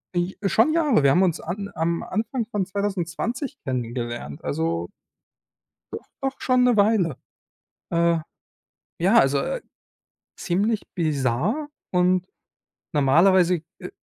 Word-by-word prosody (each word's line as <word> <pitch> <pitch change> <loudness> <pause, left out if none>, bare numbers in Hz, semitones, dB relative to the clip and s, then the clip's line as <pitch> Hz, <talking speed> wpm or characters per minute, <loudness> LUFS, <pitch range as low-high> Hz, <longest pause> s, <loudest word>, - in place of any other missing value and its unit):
Äh, 175 +2 0
schon 225 - +3
Jahre. 295 - +3
Wir 135 - +5
haben 185 +5 +4
uns 170 -4 +1
an 200 +4 -5
am 165 +1 -1
Anfang 230 +2 -2
von 205 -5 -2
2020 200 - -3
kennengelernt. 120 - -4
Also 85 +1 -2 1.0
doch - - -7
doch 270 0 -3
schon 255 -1 +3
'ne 245 -2 +4
Weile. 200 - +3 0.7
Äh, 170 0 +2 0.8
ja, 195 +7 +5
also, 135 +1 +4
äh, - - -2 0.8
ziemlich 205 +5 0
bizarr 155 - 0 0.2
und 180 0 +2 0.7
normalerweise, 170 +5 +4 0.2
äh, 180 - -7
180 Hz, 115 wpm, -24 LUFS, 155-220 Hz, 1.0 s, Wir